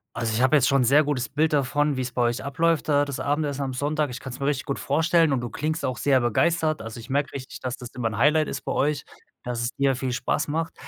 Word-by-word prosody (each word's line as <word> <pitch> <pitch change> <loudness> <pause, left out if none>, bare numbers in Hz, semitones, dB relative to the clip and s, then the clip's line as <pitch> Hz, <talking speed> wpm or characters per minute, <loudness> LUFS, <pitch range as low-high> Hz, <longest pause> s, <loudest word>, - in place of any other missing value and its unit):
Also, 115 -1 -1
ich 110 - 0
habe 130 +4 +5
jetzt 125 - +3
schon 135 -1 +3
'n - - +3
sehr 140 +5 +5
gutes 140 -4 -1
Bild 155 +3 +1
davon, 145 +1 +1
wie's 125 -1 -3
bei 125 - -1
euch 120 +1 0
abläuft 160 +3 0
da 145 0 +3
das 140 -2 -5
Abendessen 145 0 -1
am 135 -1 -2
Sonntag. 145 +2 -1
Ich 125 - -6
kann's 130 -1 -8
mir 140 - -1
richtig 145 -1 0
gut 140 - -2
vorstellen 165 +2 +2
und 130 - +1
du 120 -1 -4
klingst 155 +7 -2
auch 130 - -1
sehr 135 -2 +3
begeistert. 155 +6 +1
Also, 115 +1 -7
ich 115 - -11
merke 140 +1 0
richtig, 130 -2 -8
dass 130 -1 -4
das 125 - -8
immer 115 -3 -1
'n 105 - -6
Highlight 155 +4 +3
ist - - -4
bei - - -2
euch 145 0 0
und - - -24
dass 120 -1 -2
es 120 +1 -1
dir 135 -1 +2
viel 130 0 -3
Spaß 135 +4 -1
macht. 165 +2 -2
140 Hz, 275 wpm, -25 LUFS, 125-150 Hz, -, habe